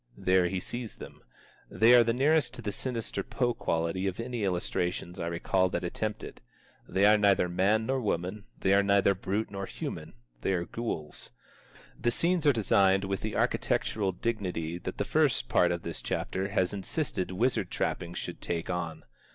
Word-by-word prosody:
There 90 -1 +3
he 95 +1 -2
sees 120 +4 -6
them. - - -11 0.5
They 115 +2 +5
are 120 -1 +8
the 115 - +1
nearest 145 +6 +2
to 120 - -9
the 105 - -2
sinister 115 -2 -3
Poe 120 +4 -1
quality 85 0 -1
of 95 +1 -3
any 120 -1 -3
illustrations 90 -1 -2
I 85 - -2
recall 95 +2 +1
that - - -2
attempt 105 +4 -3
it. - - -9 0.5
"They 95 +1 +3
are 105 0 +6
neither 100 -3 +4
man 100 +5 +2
nor 130 +1 0
woman, 100 0 -2
they 95 - +3
are 100 - +6
neither 100 0 +4
brute 100 +3 -2
nor 100 -1 -4
human; - - -6 0.3
they 95 - +1
are 85 -2 -1
ghouls." 85 -9 -5 0.7
The 120 - +2
scenes 170 +5 +1
are - - +8
designed 95 -4 +3
with 95 0 -2
the 110 - -3
architectural 100 -3 0
dignity 90 -5 -3
that - - -6
the - - -1
first - - +2
part 90 +6 +3
of 85 -1 -3
this 85 - -5
chapter 95 +1 -2
has 95 -2 0
insisted 100 - -2
wizard 115 +8 0
trappings 85 0 -2
should - - -6
take 85 +1 -2
on. 85 -3 -4
100 Hz, 180 wpm, -29 LUFS, 90-110 Hz, 0.7 s, are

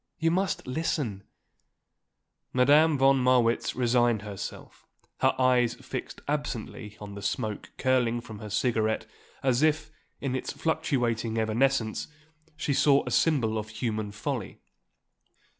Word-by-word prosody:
You 165 0 +2
must 190 +1 0
listen." 125 -7 -2 1.3
Madame 145 +4 +5
von 135 0 +5
Marwitz 125 -2 +2
resigned 120 -3 +2
herself, 100 -2 -8 0.3
her - - +3
eyes 125 -2 +3
fixed - - -7
absently 120 -6 -4
on 105 -1 -8
the 100 - -8
smoke 105 +1 -3
curling 125 -2 +2
from 110 -3 -10
her 105 - -7
cigarette 110 0 0 0.4
as 130 -1 +2
if, 155 0 +2 0.3
in 135 -2 -2
its 130 - -3
fluctuating 120 -8 -1
evanescence, 110 +1 +1 0.5
she 145 - -1
saw 140 0 +4
a - - -4
symbol 120 -9 +2
of 110 0 -6
human 110 -1 -3
folly. 105 - -4
125 Hz, 125 wpm, -28 LUFS, 110-135 Hz, 1.3 s, Madame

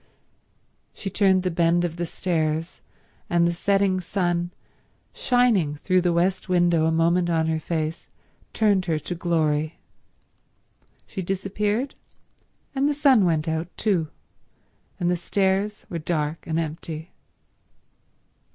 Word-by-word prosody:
She 195 - -5
turned 190 -1 +3
the 185 - 0
bend 170 +1 +2
of 170 -1 -4
the 175 0 -2
stairs, 160 -2 -2 0.5
and 170 0 +3
the 170 - +2
setting 195 +1 +1
sun, 175 -2 -1 0.6
shining 230 - +2
through 185 +5 +1
the 175 0 +2
west 185 +3 0
window 175 -3 +3
a - - +2
moment 170 +2 +2
on 165 -1 +2
her 160 0 0
face, 160 0 -3 0.4
turned 205 -4 +2
her 160 -2 +1
to 155 +4 -5
glory. 155 -3 0 1.3
She 190 - -5
disappeared, 205 +7 -1 0.8
and 280 +1 +1
the 295 - 0
sun 270 -8 +5
went 160 -2 +1
out 160 +1 -1
too, 185 -7 +1 0.9
and 175 - 0
the - - +2
stairs 195 +3 0
were 170 - -4
dark 155 -1 -2
and 160 -1 -1
empty. 160 0 -4
175 Hz, 130 wpm, -24 LUFS, 160-195 Hz, 1.3 s, sun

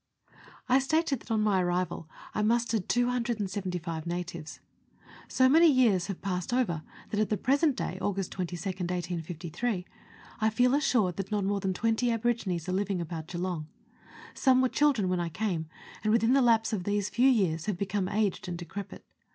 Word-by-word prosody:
I 255 +2 +5
stated 290 0 +1
that - - -17
on 220 -1 +1
my 200 -3 +3
arrival 175 -2 -2 0.2
I - - 0
mustered 225 -2 +1
275 200 -9 -1
natives. 170 -2 -5 0.7
So 260 - +4
many 320 +4 +6
years 220 -9 +3
have 195 -3 -6
passed 180 0 -2
over 230 -11 0 0.3
that 210 - -1
at 215 - +1
the 210 - +1
present 280 +4 +2
day, 185 - -4
August 195 -2 -2
22nd 180 0 -4
1853, 175 +3 -3 0.5
I 220 +1 +3
feel 245 +3 +3
assured 240 - +2
that 195 - -4
not 205 -1 0
more 200 0 0
than 190 -1 -1
twenty 225 +4 +1
aborigines 220 -7 -1
are 185 - -1
living 195 -1 0
about 165 -1 -5
Geelong. 175 -3 -3 0.7
Some 260 -1 +4
were 255 - +3
children 275 -10 +2
when 180 -1 0
I 170 -1 -1
came, 170 -3 -2 0.4
and 215 - +2
within 230 +2 +3
the 275 - +5
lapse 225 -2 +3
of 195 -4 -1
these 205 +1 0
few 255 +3 +4
years 180 -9 +1
have 205 -4 -1
become 200 0 -1
aged 205 -3 0
and 175 -1 -4
decrepit. 190 +3 -8
200 Hz, 175 wpm, -29 LUFS, 180-235 Hz, 0.7 s, many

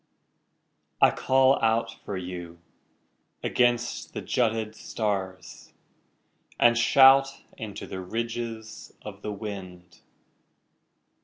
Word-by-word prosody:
I - - +6
call 130 +1 +3
out 115 0 +1
for 100 - -5
you 90 -2 -7 0.9
against 120 -1 0
the - - -3
jutted 110 -3 0
stars 95 -5 -4 0.9
And 120 0 +5
shout 135 +3 +6 0.3
into 105 -3 -7
the 95 - -6
ridges 115 +2 -5
of 100 -1 -9
the 105 - -4
wind. 95 -4 -8
110 Hz, 90 wpm, -26 LUFS, 95-120 Hz, 0.9 s, I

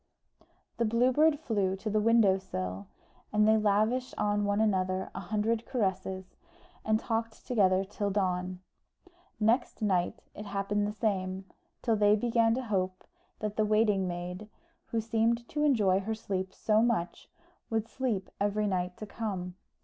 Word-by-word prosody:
The 235 - +1
Blue 235 +3 +3
Bird 300 +2 +4
flew 200 -10 0
to 195 +3 -8
the 215 0 +2
window 210 -3 +4
sill, 95 - -5 0.4
and 210 0 +3
they 220 - +6
lavished 215 +4 +1
on 205 0 +1
one 205 +1 +1
another 190 -3 0
a - - -5
hundred 220 +2 -1
caresses, 190 -5 -2 0.5
and 215 0 +2
talked 225 -1 -3
together 190 -5 +3
till 205 +1 -3
dawn. 185 -2 -1 0.8
Next 230 +3 +1
night 185 -4 0
it 210 - -8
happened 200 +1 -1
the - - -2
same, 190 -3 -2 0.4
till 230 -3 +2
they 205 0 +5
began 230 0 +2
to 260 - -2
hope 185 -5 -2 0.4
that 210 -1 -3
the 215 - +3
waiting 210 -3 +2
maid, 180 +4 -5 0.4
who 230 - -1
seemed 230 +1 0
to 300 0 -1
enjoy 210 -10 +3
her 220 +3 -3
sleep 190 -3 -3
so 215 +2 +2
much, 225 -7 -1 0.4
would 225 -1 -1
sleep 230 -8 -2
every 205 +1 +1
night 180 -2 -1
to 215 - -6
come. 195 -5 -4
210 Hz, 155 wpm, -30 LUFS, 190-225 Hz, 0.8 s, they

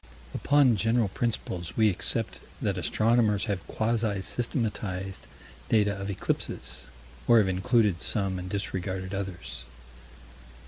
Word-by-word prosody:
Upon 140 -6 +4
general 115 0 +2
principles 95 -6 -3
we 110 -2 +5
accept 90 - +1 0.2
that - - 0
astronomers 110 -2 +2
have 100 -4 -3
quasi 110 -3 0
systematized 100 -4 -2 0.4
data 105 -2 +3
of 100 0 -5
eclipses 95 -8 -3 0.4
or 120 - +7
have 105 -3 +5
included 95 +1 +2
some 95 -2 0
and 90 +1 -6
disregarded 95 -1 -3
others. 90 -11 -5
100 Hz, 110 wpm, -28 LUFS, 95-115 Hz, 0.4 s, or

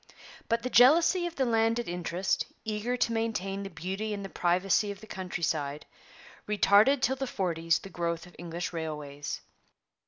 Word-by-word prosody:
But 230 0 +1
the 255 - -2
jealousy 335 +8 +6
of 340 - -8
the 265 - +1
landed 230 0 +1
interest, 175 0 -1 0.2
eager 220 +3 -1
to 240 -1 +1
maintain 205 -4 -2
the 195 - -5
beauty 190 +5 -4
and 200 -1 -6
the - - -6
privacy 185 +4 +1
of 200 -1 -6
the - - -12
countryside, 160 -7 -3 0.6
retarded 210 +6 +5
till 265 - +2
the 270 0 -2
forties 165 -6 0
the 195 - -10
growth 170 -1 -2
of 175 - -16
English 175 +1 -4
railways. 150 -3 -5
195 Hz, 160 wpm, -29 LUFS, 170-230 Hz, 0.6 s, jealousy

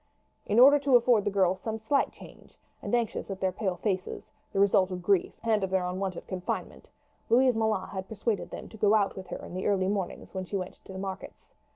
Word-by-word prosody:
In 210 - +1
order 280 +3 +8
to 275 -2 +3
afford 240 -3 +4
the - - +2
girls 190 -2 +2
some 220 -1 -3
slight 220 +6 +1
change, - - -15 0.2
and - - 0
anxious 235 -3 -2
at 195 -1 -5
their 190 -1 +1
pale 190 0 -2
faces, 185 0 -3 0.2
the 195 - -1
result 200 -1 +4
of 180 -1 -5
grief 195 -1 +2
and 220 -3 +2
of 190 - -1
their 190 -1 +1
unwonted 185 0 -3
confinement, 185 -1 -5 0.4
Louise 255 +2 +5
Moulin 220 -4 0
had 190 -1 -6
persuaded 220 0 -2
them - - -8
to 220 - -12
go 210 0 +4
out 205 -2 +1
with 190 -1 -8
her - - -7
in - - -10
the 185 +1 -2
early 190 -2 +2
mornings 195 -3 -4
when 190 -1 -4
she 200 - -5
went 185 -1 -7
to - - -10
the 190 - -7
markets. 190 0 -7
195 Hz, 225 wpm, -28 LUFS, 185-220 Hz, 0.4 s, order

